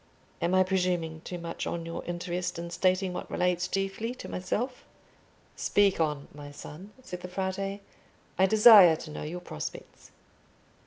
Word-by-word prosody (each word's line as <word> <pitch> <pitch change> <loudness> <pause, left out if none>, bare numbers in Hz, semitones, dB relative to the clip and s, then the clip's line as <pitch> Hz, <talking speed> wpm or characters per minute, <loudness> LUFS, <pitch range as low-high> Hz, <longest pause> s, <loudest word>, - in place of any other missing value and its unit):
Am 175 +2 +1
I 185 - +6
presuming 180 -4 -1
too 180 - -6
much 170 -1 -5
on 170 -1 -3
your 165 - -5
interest 175 0 -3
in 170 0 -6
stating 185 +1 +1
what - - -6
relates 180 0 0
chiefly 195 +5 -2
to - - -9
myself?" 245 +7 -3 0.7
"Speak 200 -3 +2
on, 150 -3 -1
my 145 0 -9
son," 150 +6 -10
said 180 -7 -7
the 180 - -6
Frate; 195 +2 -3 0.6
"I 190 - +6
desire 210 -5 +8
to 155 0 -9
know - - -6
your 170 +4 -5
prospects." 75 - -8
180 Hz, 155 wpm, -28 LUFS, 170-195 Hz, 0.7 s, desire